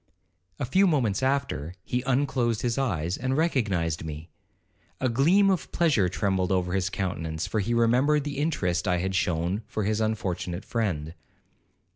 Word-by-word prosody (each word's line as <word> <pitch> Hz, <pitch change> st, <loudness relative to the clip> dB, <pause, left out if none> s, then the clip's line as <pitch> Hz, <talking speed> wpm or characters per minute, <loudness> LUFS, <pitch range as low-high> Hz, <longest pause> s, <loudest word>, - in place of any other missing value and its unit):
A -, -, -2 dB
few 190 Hz, +10 st, +3 dB
moments 125 Hz, -, +1 dB
after, 130 Hz, -, -1 dB
he 125 Hz, -, -1 dB
unclosed 125 Hz, -4 st, +1 dB
his 120 Hz, +1 st, 0 dB
eyes, 90 Hz, -, -1 dB
and 130 Hz, +1 st, -1 dB
recognized 100 Hz, -, 0 dB
me. 80 Hz, +1 st, -7 dB, 0.7 s
A 130 Hz, -, +1 dB
gleam 170 Hz, -, +4 dB
of 160 Hz, -8 st, -2 dB
pleasure 140 Hz, -, +2 dB
trembled 95 Hz, 0 st, 0 dB
over 90 Hz, -1 st, 0 dB
his 95 Hz, -1 st, 0 dB
countenance, 80 Hz, -5 st, -3 dB
for 110 Hz, -, -1 dB
he 115 Hz, +4 st, 0 dB
remembered 125 Hz, +6 st, +3 dB
the 145 Hz, -1 st, -4 dB
interest 90 Hz, -, 0 dB
I 90 Hz, -1 st, +2 dB
had 95 Hz, +2 st, -2 dB
shewn 90 Hz, +2 st, 0 dB
for 110 Hz, -, -3 dB
his 110 Hz, +2 st, 0 dB
unfortunate 95 Hz, -4 st, -2 dB
friend. 85 Hz, -9 st, -2 dB
110 Hz, 155 wpm, -26 LUFS, 90-135 Hz, 0.7 s, gleam